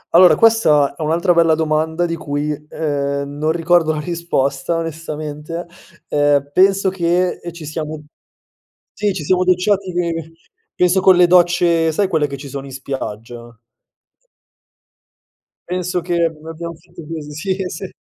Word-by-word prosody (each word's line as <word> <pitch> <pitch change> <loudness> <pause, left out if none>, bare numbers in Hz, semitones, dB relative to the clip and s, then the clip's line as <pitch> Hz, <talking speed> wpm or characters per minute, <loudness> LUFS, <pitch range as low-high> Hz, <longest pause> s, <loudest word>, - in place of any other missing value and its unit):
Allora, 180 +1 +8
questa 160 -11 +4
è - - -9
un 155 - -1
altra 170 +2 +2
bella 165 -1 +4
domanda 160 +2 0
di 165 -1 -2
cui, 150 -1 -3
ehm, 140 -1 -3
non 145 +2 -3
ricordo 165 -1 +2
la 150 - -3
risposta 165 -3 -1
onestamente, 155 0 -5 0.4
ehm, 145 -1 +1
penso 195 +2 +4
che, 180 0 0
ehm, 175 - -6
ci 165 -2 -10
siamo 155 0 -5 0.9
sì 205 -1 0
ci 175 -5 -5
siamo 185 +3 +2
docciati 185 +1 +1
che 165 -2 -3 0.4
penso 180 +1 +3
con 185 0 +6
le 180 0 +6
docce 175 -2 +3
sai 195 +5 +1
quelle 160 -5 +1
che 140 -1 -6
ci 140 +1 -9
sono 135 +1 -6
in 135 - -10
spiaggia? 120 -3 -7 2.1
Penso 180 0 -2
che 175 0 -2 0.2
l'abbiam 165 +1 -7
fatta 170 +1 -14
cos 155 -2 -6
Sì, 190 +3 -1
sì. 180 +3 -7
165 Hz, 145 wpm, -18 LUFS, 150-175 Hz, 2.1 s, Allora